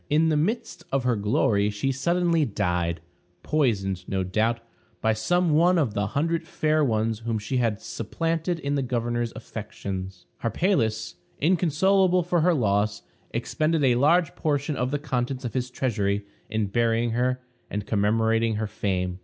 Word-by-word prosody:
In 160 +2 +3
the 155 - +2
midst 220 +10 -1
of 135 -1 +1
her 125 -1 +2
glory 105 -1 +2
she 105 +6 -1
suddenly 170 +4 +1
died; 90 - -1 0.4
poisoned, 100 - 0
no 95 -1 0
doubt, 110 +5 0 0.4
by 110 0 +2
some 175 +11 +1
one 175 +4 +4
of 135 -10 +1
the 105 0 0
hundred 165 +2 0
fair 155 -1 +1
ones 110 -3 0
whom 115 -1 -2
she 105 +5 -2
had 115 -4 +1
supplanted 165 - -2
in 140 -3 -2
the 140 - +1
governor's 120 -2 -1
affections. 95 -4 -6 0.2
Harpalus, 115 - 0 0.2
inconsolable 180 +3 +3
for 175 0 +1
her 175 +1 +4
loss, 105 -4 +1 0.3
expended 155 0 0
a 130 -2 +5
large 155 +8 +3
portion 145 -1 -1
of 125 -1 -1
the 145 - 0
contents 130 -2 -2
of 115 - -4
his 125 -1 -1
treasury 105 -6 -1 0.2
in 110 -1 0
burying 115 +2 +1
her 125 +2 0 0.3
and 105 0 -3
commemorating 110 +2 +2
her 110 +1 -1
fame. 90 -3 -2
120 Hz, 155 wpm, -25 LUFS, 105-155 Hz, 0.4 s, a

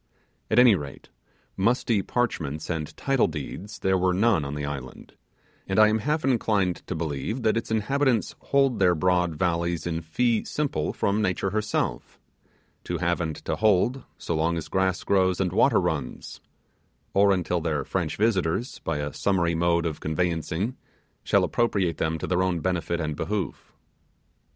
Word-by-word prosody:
At 110 - +1
any 125 -2 +8
rate, 70 -7 -6 0.5
musty 115 +1 +1
parchments 80 - -2
and 80 -2 -4
title 135 -2 +2
deeds 85 +7 -6
there 95 -1 +1
were 90 0 +2
none 100 -4 +3
on 70 +1 -4
the 75 0 -3
island; 70 -3 -7 0.5
and 95 - -1
I 110 0 +7
am 110 +1 +1
half 150 +6 -1
inclined 105 -8 +1
to 90 - -3
believe 80 - -3
that 110 - +3
its 115 - -2
inhabitants 120 +2 +1
hold 135 -3 +2
their 90 -2 +4
broad 90 0 +1
valleys 85 0 -1
in 85 -1 -2
fee 110 +8 +1
simple 140 - -1
from 100 +2 0
Nature 95 -1 0
herself; 110 0 -2 0.7
to 90 - -2
have 85 +1 0
and 80 -2 -2
to - - -1
hold, 110 +5 +2
so 85 - -3
long 85 +2 +1
as 80 - -6
grass 95 -1 0
grows 95 -2 +2
and 90 -2 0
water - - +4
runs; 70 -5 -4 0.7
or 100 0 +5
until 90 -2 0
their 80 -3 -1
French - - -2
visitors, 105 +1 0
by - - -2
a 75 0 -3
summary 85 -4 +1
mode 85 0 +1
of 80 -3 -3
conveyancing, 85 +7 -1 0.5
shall - - +3
appropriate 100 -8 0
them 80 0 -1
to - - -4
their 90 0 +1
own 90 -2 0
benefit 85 -1 -1
and 75 -2 -2
behoof. 100 +2 -4
90 Hz, 165 wpm, -26 LUFS, 80-110 Hz, 0.7 s, any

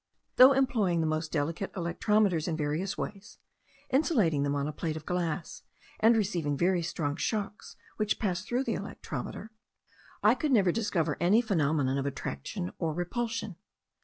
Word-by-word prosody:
Though 260 +2 +9
employing 230 -10 +2
the - - +1
most 155 0 -1
delicate 160 +5 -2
electrometers 185 0 +1
in 165 -2 -1
various 155 +5 -2
ways, 200 +1 -6 0.5
insulating 230 - +2
them 140 0 0
on 140 0 -1
a - - -2
plate 160 -1 -3
of 155 - -9
glass, 175 -2 -3 0.4
and 225 +1 +5
receiving 170 -9 0
very 175 +2 +2
strong 160 -4 -2
shocks 210 0 -3 0.2
which 215 -1 0
passed 185 -2 -2
through 245 +2 0
the - - -1
electrometer, 220 - -6 0.7
I - - +6
could 305 -3 -1
never 195 -6 +4
discover 170 -8 0
any 190 +6 +4
phenomenon 150 - +1
of 135 - -1
attraction 85 - -4
or 160 -2 -1
repulsion. 220 +1 -3
175 Hz, 155 wpm, -29 LUFS, 155-215 Hz, 0.7 s, Though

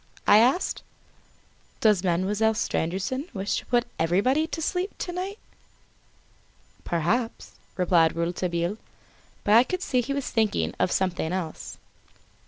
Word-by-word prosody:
I 205 - +7
asked. 260 +11 +2 1.0
"Does 210 -4 +3
Mademoiselle 200 +5 +1
Stangerson 215 - -2
wish 195 +1 -1
to - - -15
put 240 -1 +2
everybody 230 - +2
to 330 - -5
sleep, 360 +4 -2
to 355 - -4
night?" 375 +3 -4 1.5
"Perhaps," 195 +9 -1 0.3
replied 170 -3 +3
Rouletabille; 170 +2 -1 0.7
but 210 - +3
I 230 +2 +8
could 365 +8 -4
see 250 -2 +1
he 250 +4 -3
was 280 -2 -3
thinking 150 - +1
of 180 - +2
something 180 -3 0
else. 180 -4 -5
210 Hz, 125 wpm, -26 LUFS, 175-255 Hz, 1.5 s, I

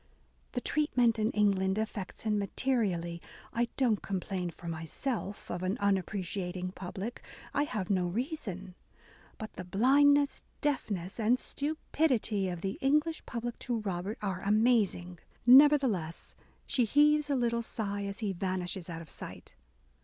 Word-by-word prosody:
"The 245 - -1
treatment 245 -7 +2
in 215 +1 +2
England 195 -3 +2
affects 215 -3 -4
him 210 -2 +1
materially... 195 -6 -1 0.3
I 235 +1 +1
don't 235 -6 +2
complain 185 -1 -3
for 170 +1 -11
myself 195 - -4
of 175 - -3
an 185 +4 -1
unappreciating 190 -2 -1
public; 195 +5 -6 0.2
/ - - -18
have 245 -10 -1
no 185 -2 +2
reason... 195 - -4 0.6
But, 220 - -7
the 185 - -6
blindness, 280 +9 +4 0.2
deafness, 205 -10 -2
and 230 +3 +3
stupidity 265 -9 0
of 175 -2 -5
the 195 +1 -3
English 300 +4 +2
public 240 0 -4
to 240 -3 -2
Robert 195 +1 -3
are 190 -3 -2
amazing." 205 -5 +2 0.3
Nevertheless, 255 - +5 0.3
she 260 -4 +2
heaves 295 +4 +4
a 280 - +2
little 235 -2 +1
sigh 205 -3 -3
as 200 +3 -4
he 195 - 0
vanishes 185 -1 -2
out 165 0 -5
of 155 - -16
sight. - - -9
210 Hz, 140 wpm, -31 LUFS, 185-250 Hz, 0.6 s, Nevertheless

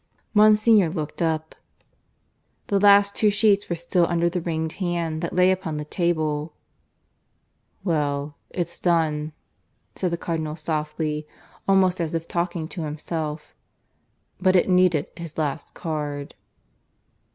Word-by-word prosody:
Monsignor 215 -2 +5
looked 155 -2 -5
up. 160 -1 -1 1.2
The 200 - +2
last 200 0 +6
two 215 - +3
sheets 205 -1 +3
were 170 - 0
still 170 +1 +1
under 170 0 +1
the 180 0 -2
ringed 160 -1 -2
hand 170 -3 -1
that 170 - -3
lay 180 +1 +5
upon 180 -5 -2
the 150 - -4
table. 155 -2 -1 1.3
"Well, 145 -4 -1
it's 170 -2 -4
done," 155 -3 +1 0.6
said 185 - -1
the 170 - -2
Cardinal 160 -2 -3
softly, 155 -1 -3 0.4
almost 185 -2 +3
as 165 0 -2
if 165 0 -3
talking 170 -2 -2
to 180 - -6
himself. 155 0 -4 0.9
"But 185 0 +3
it 180 - +4
needed 180 -5 +3
his 165 -2 -8
last 155 -1 -3
card." 145 -3 -4
165 Hz, 130 wpm, -24 LUFS, 155-180 Hz, 1.3 s, last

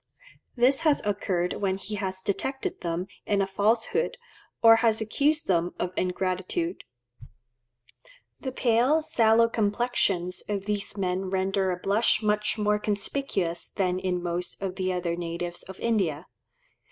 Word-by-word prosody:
This 255 +2 +4
has 310 -3 +2
occurred 190 -3 -1
when 190 -1 +1
he 205 +2 -8
has 190 -2 -3
detected 265 +7 -2
them 170 +1 -2 0.2
in 205 -1 +2
a 195 - +3
falsehood, 225 - 0 0.5
or 225 0 +9
has 225 -1 +3
accused 290 +8 +1
them 175 - +1
of 180 0 -3
ingratitude. 185 - -2 1.5
The 260 - -4
pale, 255 +6 +2
sallow 230 -6 +4
complexions 205 -5 0
of 200 -2 -2
these 210 0 -2
men 185 0 -1
render 190 0 0
a 180 - -1
blush 200 +5 +2
much 210 +1 +1
more 210 0 +2
conspicuous 200 -5 -1
than 185 -2 -1
in 180 -2 -2
most 175 0 -3
of 190 -2 -3
the 185 -1 -1
other 175 -2 -1
natives 175 0 -4
of 190 0 -11
India. 185 -9 0
200 Hz, 140 wpm, -27 LUFS, 180-225 Hz, 1.5 s, or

